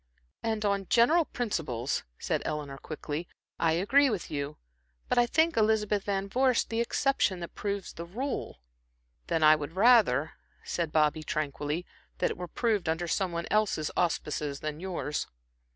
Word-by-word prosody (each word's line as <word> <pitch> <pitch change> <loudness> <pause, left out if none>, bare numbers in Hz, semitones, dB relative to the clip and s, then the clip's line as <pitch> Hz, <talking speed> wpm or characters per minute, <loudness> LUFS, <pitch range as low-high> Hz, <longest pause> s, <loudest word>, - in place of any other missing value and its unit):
"And 220 -1 -1
on 200 -2 0
general 305 +8 +5
principles," 150 - -2
said - - -1
Eleanor, 145 -2 -4
quickly 155 +2 -5 0.3
"I 165 -1 +3
agree 265 - +4
with 210 -7 -3
you, 145 0 -3 0.5
but - - +2
I 240 - +4
think 320 +6 +2
Elizabeth 210 -2 +2
Van 195 -1 -1
Vorst 255 +3 +2
the 225 +1 +1
exception 235 -6 +1
that 170 - -7
proves 200 -2 -3
the 170 - -7
rule." 245 - -4 0.7
"Then 160 - +1
I 155 0 +8
would 150 +1 -6
rather," 195 - +5 0.3
said 170 -3 -2
Bobby, 155 0 +2
tranquilly, 150 +2 -2 0.3
"that - - +1
it - - -6
were 180 0 -5
proved 210 -4 0
under 165 +2 -1
some 185 +1 0
one 170 0 -3
else's 210 -7 +1
auspices 150 -4 -1
than 155 0 -4
yours." 175 -5 -3
180 Hz, 155 wpm, -29 LUFS, 155-220 Hz, 0.7 s, I